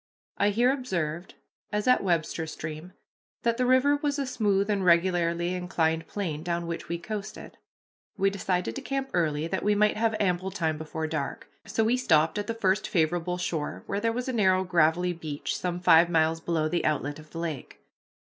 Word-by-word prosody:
I 205 - +4
here 240 +5 +3
observed, 175 - -3 0.4
as 210 +2 -1
at 250 - +4
Webster 165 -2 0
Stream, 155 +3 -7 0.5
that 235 0 +1
the 250 0 +1
river 260 +3 +4
was 290 -1 -1
a 280 - -1
smooth 205 -5 +1
and 205 -2 0
regularly 170 0 +2
inclined 165 -3 -1
plane 165 -7 -3
down 170 0 -2
which 170 0 -5
we 170 - -1
coasted. 210 +4 -7 0.6
We 195 0 +2
decided 180 - -1
to - - -4
camp 270 -1 -3
early 155 -3 +1
that 190 +3 -2
we 210 0 +2
might 210 +1 +3
have 225 0 +1
ample 185 -1 0
time 160 -5 -2
before 160 0 -4
dark. 155 -3 -4 0.2
So 225 - +1
we 235 +3 +2
stopped 160 -7 +2
at 205 - -4
the 230 - -2
first 205 -1 +1
favorable 175 +1 0
shore, 160 -4 -3
where 200 - -2
there 230 +2 +1
was 245 +2 -3
a 260 - -2
narrow 190 -4 +3
gravelly 175 0 +2
beach, 155 -4 -4
some 175 -1 -3
five 170 -1 +6
miles 165 -1 +2
below 160 -2 0
the 175 +2 -1
outlet 145 0 -1
of 155 0 -14
the 165 - -9
lake. 160 -6 -5
180 Hz, 190 wpm, -27 LUFS, 160-210 Hz, 0.6 s, five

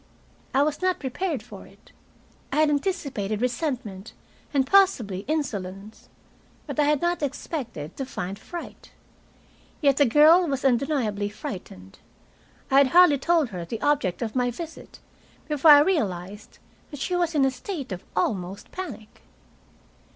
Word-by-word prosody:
I 270 +2 +3
was 300 +2 -2
not 370 0 +1
prepared 295 +3 -3
for - - -12
it. - - -21 0.6
I - - -2
had 305 -1 +3
anticipated 280 - -2
resentment 240 - -3 0.4
and 275 -3 +2
possibly 265 - +3
insolence. 210 -9 -4 0.6
But - - -5
I 295 - +4
had 300 0 +1
not 345 0 0
expected 250 - -5
to 270 - -3
find 195 -4 -5
fright. 345 +7 -9 0.9
Yet 280 -3 +3
the 285 - +5
girl 315 +8 +6
was 275 -2 -2
undeniably 240 -6 +1
frightened. 180 - -9 0.7
I 270 - +6
had 280 - +5
hardly 335 -1 +6
told 325 -3 +2
her 180 -4 -6
the 220 +6 -5
object 265 -9 +1
of 225 +1 -5
my 250 -1 +1
visit 325 +6 -9 0.5
before 300 0 +3
I 290 -1 +10
realized 205 - -2 0.3
that 290 - -9
she 360 +6 -1
was 345 -2 0
in 280 -2 +4
a 265 - +2
state 280 - -6
of 180 -1 -5
almost 185 0 -2
panic. 345 - -8
270 Hz, 145 wpm, -25 LUFS, 210-310 Hz, 0.9 s, I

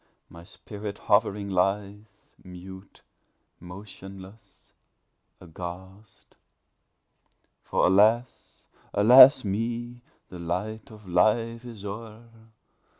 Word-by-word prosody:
my 85 0 -13
spirit 100 +3 -9
hovering 100 -1 0
lies 100 +2 -3
Mute, 95 +1 -13 0.6
motionless, 95 +2 -13 0.7
aghast! 95 +4 -11 1.3
For, - - 0
alas! 110 +6 +1 0.3
alas! 130 +6 +8
with 100 - -3
me 120 +3 -4 0.3
The 90 - -10
light 95 +6 -5
of 105 -3 -15
Life 115 +6 +1
is 110 -4 -10
o'er! 110 +3 -9
100 Hz, 85 wpm, -26 LUFS, 95-110 Hz, 1.3 s, alas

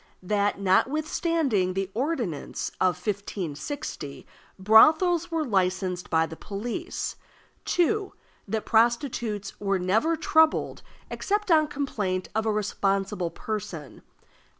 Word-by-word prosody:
That, 205 +1 0
notwithstanding 265 - +1
the 195 0 -2
ordinance 240 - -2
of 180 -2 +3
1560, 185 - -5 0.3
brothels 315 - +5
were 325 -2 -1
licensed 185 -4 0
by 160 -1 +3
the 160 - -8
police. 230 - -5 0.5
(2.) 390 +3 +1 0.4
That 220 -1 -2
prostitutes 230 -3 +1
were 195 -1 0
never 220 - +1
troubled 320 0 +2 0.3
except 415 -1 -1
on 310 -2 +5
complaint 210 -11 -2
of 220 +1 0
a - - +3
responsible 195 -3 -1
person. 190 -5 -6
210 Hz, 105 wpm, -26 LUFS, 185-300 Hz, 0.5 s, brothels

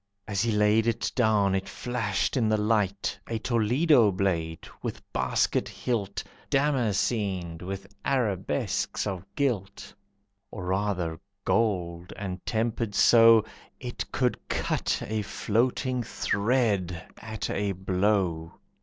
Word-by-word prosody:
As 100 -3 0
he 115 0 +1
laid 105 +1 +3
it 115 0 0
down 105 -5 +3
it 95 0 -1
flashed 115 -4 -1
in 115 -5 +2
the 110 - +3
light, 105 -2 0
A 115 - -2
Toledo 120 +2 +3
blade, 85 -4 -1
with - - -4
basket - - +1
hilt, 115 -6 -2 0.3
Damascened 105 - 0
with 95 +1 -5 0.2
arabesques 105 -9 0
of 95 -3 -3
gilt, 110 -8 -2 0.6
Or 90 - -7
rather 90 -4 -1 0.3
gold, 90 -6 0
and 95 -2 -5
tempered 110 -1 -1
so 115 -2 +7 0.3
It 125 -2 -5
could 125 -2 +1
cut - - -1
a 110 0 -1
floating 125 +5 0
thread 100 -6 0
at 110 -2 -4
a 100 -1 0
blow. 95 -3 0
105 Hz, 115 wpm, -27 LUFS, 95-115 Hz, 0.6 s, so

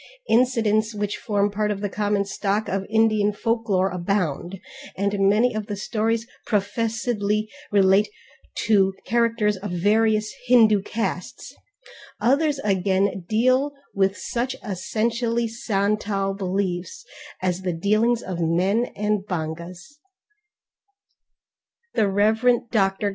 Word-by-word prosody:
Incidents 225 -3 +2
which 205 0 -2
form 205 -1 0
part 210 +1 -1
of 205 -2 -2
the 205 - -2
common 205 0 0
stock 200 +2 -1
of 195 0 -2
Indian 215 -2 +3
folklore 210 -3 0
abound, 180 -1 -2 0.4
and 200 0 +2
many 230 +4 +3
of 215 -1 -4
the 205 - -3
stories 225 +2 -1 0.2
professedly 215 0 -1 0.2
relate 200 +1 +4 0.5
to 195 -3 +2
characters 230 -3 +1
of 200 +2 -6
various 215 +4 +1
Hindu 220 -5 +5
castes, 195 -3 -4 0.7
others 285 +4 +2
again 195 -1 +1
deal 255 +6 +2 0.2
with 195 0 +1
such 250 +2 -3
essentially 230 +4 -1
Santal 205 -3 -1
beliefs 190 - -3 0.3
as 185 0 -1
the 185 -1 -1
dealings 215 +7 +1
of 180 -2 -5
men 180 +8 +1
and 210 -1 0
bongas. 175 - -6 1.9
The 215 - +2
Rev. 220 +4 +2
Dr. 195 -1 +1
210 Hz, 110 wpm, -23 LUFS, 195-225 Hz, 1.9 s, Hindu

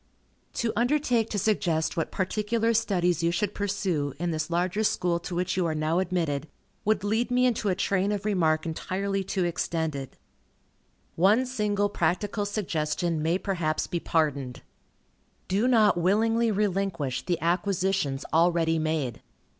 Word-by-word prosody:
To 230 -2 -1
undertake 240 -2 +1
to 210 - -2
suggest 175 -6 0
what 165 - -1
particular 215 +4 0
studies 180 -7 +1
you 170 - +2
should 200 +4 -1
pursue, 185 -8 -1
in 175 +1 -1
this 155 0 -2
larger 180 +5 0
school 175 -4 +1
to 175 +1 -6
which 180 +1 -1
you 180 -2 +1
are 160 - -1
now 155 +3 +1
admitted, 165 -6 -1 0.4
would 210 -2 +1
lead 220 +4 0
me 250 0 +3
into 225 -4 +1
a 185 - +1
train 195 +1 +1
of 205 0 -3
remark 165 -6 +1
entirely 195 +4 -2
too 190 0 -1
extended. 160 -5 -3 1.0
One 205 +9 +4
single 210 -5 0
practical 205 +3 -1
suggestion 170 -5 -1
may 165 +3 +1
perhaps 170 -6 -1
be 175 - -3
pardoned. 140 -7 -1 0.8
Do 205 +6 +1
not 220 -7 +4
willingly 225 +6 +2
relinquish 195 - -1
the 175 -2 -1
acquisitions 175 -4 0
already 165 -1 +3
made. 155 -6 -2
185 Hz, 145 wpm, -27 LUFS, 165-210 Hz, 1.0 s, One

